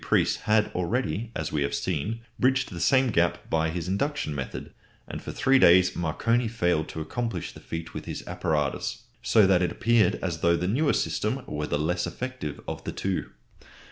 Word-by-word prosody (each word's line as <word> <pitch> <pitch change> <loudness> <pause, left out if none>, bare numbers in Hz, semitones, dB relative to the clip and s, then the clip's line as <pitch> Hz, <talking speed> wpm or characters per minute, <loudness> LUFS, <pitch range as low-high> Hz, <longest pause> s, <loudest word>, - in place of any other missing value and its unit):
Preece - - +2
had 105 0 +3
already, 110 +4 -1
as 80 - -3
we 75 - 0
have 70 - 0
seen, 95 +7 -2 0.2
bridged 130 -1 +2
the 90 - -6
same 130 +8 +3
gap 85 -3 +1
by 80 0 +2
his 85 +1 -4
induction 100 - -1
method, 70 -3 -6 0.3
and - - -6
for - - -6
three 135 0 +3
days 90 -1 +6
Marconi 115 +9 +1
failed 90 -8 0
to 80 - -5
accomplish 115 +9 -3
the - - -11
feat 80 0 -6
with - - -6
his - - -5
apparatus, 75 -3 -2 0.2
so 110 -3 +5
that 95 -2 +4
it 90 - +1
appeared 115 -5 +3
as 85 -4 -3
though 85 +1 +3
the 90 - -1
newer 140 +9 +2
system - - -1
were 75 0 -3
the - - 0
less 90 +4 0
effective 85 - -5
of - - -5
the - - -4
two. 95 -1 -2
90 Hz, 190 wpm, -27 LUFS, 80-115 Hz, 0.3 s, days